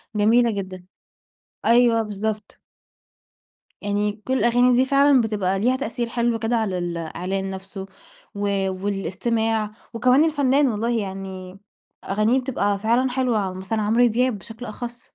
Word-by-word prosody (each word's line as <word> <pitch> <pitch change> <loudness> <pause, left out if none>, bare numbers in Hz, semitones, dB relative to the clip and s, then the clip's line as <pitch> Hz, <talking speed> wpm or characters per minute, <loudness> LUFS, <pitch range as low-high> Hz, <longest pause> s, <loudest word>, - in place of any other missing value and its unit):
جميلة 230 +3 +4
جدًا، 185 -3 -6 0.8
أيوه 235 -1 +4
بالضبط. 215 0 -4 1.2
يعني 205 0 0
كل 260 - +1
الأغاني 245 +1 +4
دي 260 - +4
فعلًا 275 -1 +4
بتبقى 200 -4 0
ليها 250 +4 +2
تأثير 240 -2 -3
حلو 235 -1 0
كده 225 +1 0
على 200 -5 -1
ال 175 -1 -3
الإعلان 185 +4 -3
نفسه، 190 0 -7 0.5
و 205 0 -2 0.4
والاستماع 215 +3 -1 0.2
وكمان 255 +5 +4
الفنّان 285 -3 +2
والله، 230 +1 -1
يعني 190 -1 -7 0.5
أغانيه 215 +6 +1
بتبقى 205 -6 -1
فعلًا 235 +5 +1
حلوة، 240 -7 0
مثلًا 190 +4 -3
عمرو 230 +4 +3
دياب 240 0 +1
بشكل 225 +5 -9
أخص. 240 +1 -6
220 Hz, 130 wpm, -23 LUFS, 195-245 Hz, 1.2 s, جميلة